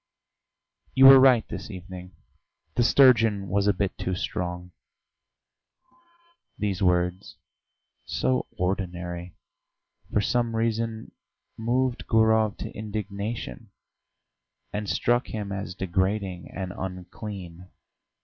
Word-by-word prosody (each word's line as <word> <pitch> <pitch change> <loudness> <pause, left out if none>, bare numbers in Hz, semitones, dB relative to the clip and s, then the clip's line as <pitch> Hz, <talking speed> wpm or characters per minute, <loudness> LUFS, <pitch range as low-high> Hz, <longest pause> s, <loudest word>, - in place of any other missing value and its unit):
"You 135 0 +7
were 135 0 +11
right 130 -3 +5
this - - -7
evening: 90 -2 -9 0.6
the - - +1
sturgeon 115 -6 +4
was 100 +2 +1
a - - +6
bit 100 -1 -2
too 95 - -2
strong!" 90 0 -4 1.9
These 100 -3 -2
words, 90 0 0 0.7
so 65 0 0
ordinary, 90 -2 -3 0.8
for - - +2
some 115 +2 0
reason 115 0 -2 0.4
moved 125 +2 -1
Gurov 110 -1 +3
to - - -6
indignation, 105 +1 -5 1.0
and 105 -1 -3
struck 120 +8 +1
him 105 -2 -5
as 95 -2 -5
degrading 95 0 -2
and 95 -2 -5
unclean. 90 -1 -7
100 Hz, 100 wpm, -26 LUFS, 90-110 Hz, 1.9 s, were